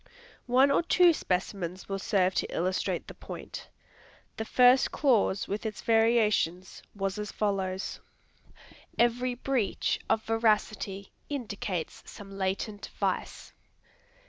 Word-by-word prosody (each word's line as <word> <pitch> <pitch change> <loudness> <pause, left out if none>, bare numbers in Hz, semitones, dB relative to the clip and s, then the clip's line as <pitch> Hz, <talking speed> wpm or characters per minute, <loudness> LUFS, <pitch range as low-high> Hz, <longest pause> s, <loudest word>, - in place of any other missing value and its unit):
One 260 +3 +5
or 280 - +4
two 345 0 +5
specimens 185 - -3
will 195 0 -3
serve 190 -2 +2
to - - 0
illustrate 185 +2 -1
the - - -8
point. - - -9 0.7
The 220 - -3
first 250 +3 +5
clause 230 -9 +2
with 205 +2 -3
its 220 -2 -4
variations, 220 -6 +2
was 195 0 -2
as 210 0 -4
follows: 190 -2 -2 1.0
Every 245 +1 +2
breach 245 -5 -1
of 220 - +2
veracity 215 -3 0 0.2
indicates 205 - -4
some 195 -1 -10
latent 195 +2 -3
vice. - - -2
210 Hz, 115 wpm, -29 LUFS, 190-235 Hz, 1.0 s, One